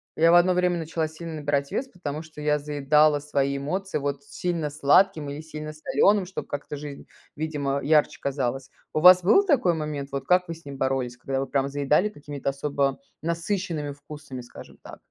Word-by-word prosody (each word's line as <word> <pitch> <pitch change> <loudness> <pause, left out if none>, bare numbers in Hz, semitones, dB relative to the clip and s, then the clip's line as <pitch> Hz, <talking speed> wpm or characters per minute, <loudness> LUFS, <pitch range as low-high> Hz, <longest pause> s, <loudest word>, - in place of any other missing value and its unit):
я 165 +1 +5
в - - +7
одно 175 +1 +5
время 180 -1 +1
начала 160 0 -2
сильно 160 +1 -8
набирать 145 -1 -1
вес, 265 - -2
потому 155 - -6
что 155 -2 -11
я 150 0 +2
заедала 150 +1 +3
свои 140 -1 -1
эмоции, 185 +6 -2
вот, 140 0 -3
сильно 160 +1 -3
сладким 150 +2 +3
или 145 +2 -6
сильно 155 -1 -7
солёным, 195 +5 +2
чтоб 185 +2 -6
как-то 145 0 -5
жизнь, 145 -1 -8 0.3
видимо, 145 -3 -2
ярче 150 +1 +3
казалась. 135 -1 -2 0.2
У - - +3
вас 180 +2 +9
был 390 - +5
такой 250 - +3
момент? 150 -3 -4
Вот, 140 -1 -4
как 180 0 +3
вы 165 - -5
с 165 - -18
ним 140 -1 -7
боролись, 130 -2 -1
когда 135 +2 -3
вы 135 - -1
прям 135 0 0
заедали 145 +7 +2
какими-то 145 -7 -5
особо 140 -1 -1 0.2
насыщенными 170 -2 -2
вкусами, 145 -2 -9
скажем 120 - -13
так? - - -11
150 Hz, 185 wpm, -25 LUFS, 140-165 Hz, 0.3 s, вас